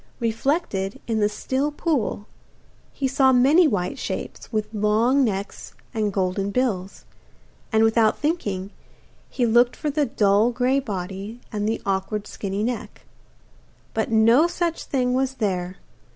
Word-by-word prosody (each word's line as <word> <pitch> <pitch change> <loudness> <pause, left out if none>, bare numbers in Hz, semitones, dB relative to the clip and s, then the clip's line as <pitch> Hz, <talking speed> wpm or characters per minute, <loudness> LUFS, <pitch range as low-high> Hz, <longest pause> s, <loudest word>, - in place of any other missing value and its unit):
Reflected 230 - -1
in 225 -2 -1
the 210 0 +3
still 265 +7 -2
pool 290 -9 -1 0.7
he 270 - -2
saw 265 0 +4
many 280 +7 +5
white 180 -9 -2
shapes, - - -5
with 215 -1 -2
long 220 +6 +3
necks 200 -4 -4 0.2
and 215 -3 0
golden 195 +1 -1
bills, 200 -5 -2 0.7
and, 220 -1 +4
without 225 -1 +3
thinking, 205 - -2 0.6
he 245 - 0
looked 240 +2 +4
for 300 - -2
the 295 -1 +1
dull 210 0 +3
grey 250 +3 +1
body 200 -1 -5
and 210 -1 -1
the 225 - -3
awkward 195 +2 -1
skinny 200 0 -4
neck. 240 0 -4 0.9
But 220 - -1
no 230 +8 +5
such 345 -1 -2
thing 250 -2 0
was 265 +1 0
there. 185 -5 -2
225 Hz, 135 wpm, -23 LUFS, 200-260 Hz, 0.9 s, many